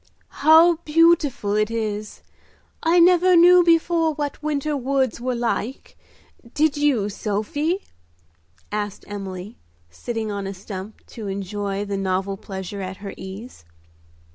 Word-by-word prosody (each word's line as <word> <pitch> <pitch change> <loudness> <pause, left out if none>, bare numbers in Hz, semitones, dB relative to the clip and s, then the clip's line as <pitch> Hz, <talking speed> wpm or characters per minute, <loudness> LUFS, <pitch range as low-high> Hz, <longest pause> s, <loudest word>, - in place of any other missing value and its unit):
"How 320 +3 +6
beautiful 310 -9 +2
it 215 0 +1
is! 215 -2 -4 0.6
I 335 +2 +3
never 360 +1 +5
knew 355 +1 +7
before 330 -1 +2
what 290 -1 -4
winter 300 0 -1
woods 265 -3 -1
were 250 0 -1
like. 235 +1 -3 0.6
Did 305 -1 +2
you, 285 -8 +1
Sophie?" 260 - -2 0.9
asked 205 -1 -4
Emily, 195 0 -7 0.3
sitting 220 - -4
on 200 -1 -4
a 195 - -6
stump 195 +2 -9
to 220 -4 -8
enjoy 200 +1 -3
the 200 -1 -3
novel 190 0 -1
pleasure 190 0 -7
at 185 0 -6
her 200 -1 -8
ease. 190 - -10
225 Hz, 125 wpm, -22 LUFS, 200-305 Hz, 0.9 s, knew